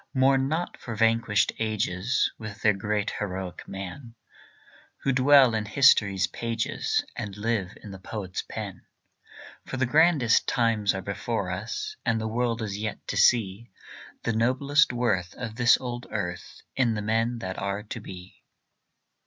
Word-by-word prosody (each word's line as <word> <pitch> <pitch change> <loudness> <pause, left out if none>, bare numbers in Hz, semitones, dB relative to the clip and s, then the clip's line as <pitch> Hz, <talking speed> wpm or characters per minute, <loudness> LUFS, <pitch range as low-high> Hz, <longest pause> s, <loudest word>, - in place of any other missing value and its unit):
Mourn 135 0 +3
not 160 +4 -2
for 115 - -7
vanished 115 -1 +2
ages, 110 +1 0
With 110 -2 -8
their 105 - +5
great 105 +1 -1
heroic 95 -3 -5
men, 115 +6 -8 0.9
Who 135 - +2
dwell 130 -1 +6
in 110 -1 -1
history's 105 -6 +4
pages 115 +2 -2
And 105 -3 -6
live 105 -3 -2
in 105 - -9
the 95 - -9
poet's 95 -2 -5
pen. - - -7 0.9
For 130 - -4
the 130 - +2
grandest 150 -3 +4
times 115 -4 +1
are 95 - -4
before 100 -1 -3
us, 125 - -4
And 115 - +1
the 110 - -2
world 115 0 -1
is 100 -1 -4
yet 110 0 -5
to - - -2
see 115 -1 +2 0.5
The 115 - 0
noblest 130 +6 +3
worth 105 -8 -1
of 115 -3 -6
this 120 0 +5
old 120 -1 -6
earth 90 -5 -5
In 120 -4 +2
the 105 - -3
men 115 +3 0
that 95 -5 -5
are 100 +1 -3
to 105 - -7
be. 90 0 -11
110 Hz, 155 wpm, -26 LUFS, 100-125 Hz, 0.9 s, dwell